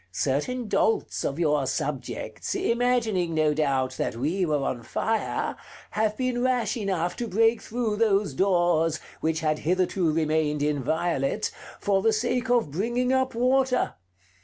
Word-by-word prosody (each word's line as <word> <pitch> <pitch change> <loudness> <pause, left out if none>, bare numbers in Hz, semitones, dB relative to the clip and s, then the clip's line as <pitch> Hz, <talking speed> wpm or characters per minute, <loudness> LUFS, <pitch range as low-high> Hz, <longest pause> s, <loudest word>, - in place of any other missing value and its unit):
Certain 150 - -1
dolts 220 +2 +1
of 140 - -2
your 150 -5 +1
subjects, 135 -5 -3
imagining, 230 -8 +1
no 155 -1 +3
doubt, 135 -4 0
that - - -2
we 165 +10 0
were 150 -3 0
on 125 -3 -2
fire, 220 - -1 0.4
have 215 0 0
been 255 -2 -1
rash 250 -2 +1
enough 185 -6 -1
to 240 - -3
break 225 +3 +3
through 225 -2 -2
those 205 -7 +2
doors, 175 -2 +2 0.2
which 160 0 -1
had 155 -1 0
hitherto 180 0 +1
remained 155 -2 +1
inviolate, 150 0 0 0.3
for 195 -1 +1
the 225 +2 +3
sake 245 +3 0
of 240 - +2
bringing 240 - 0
up 260 -1 +1
water. 255 +1 +2
185 Hz, 140 wpm, -26 LUFS, 150-230 Hz, 0.4 s, no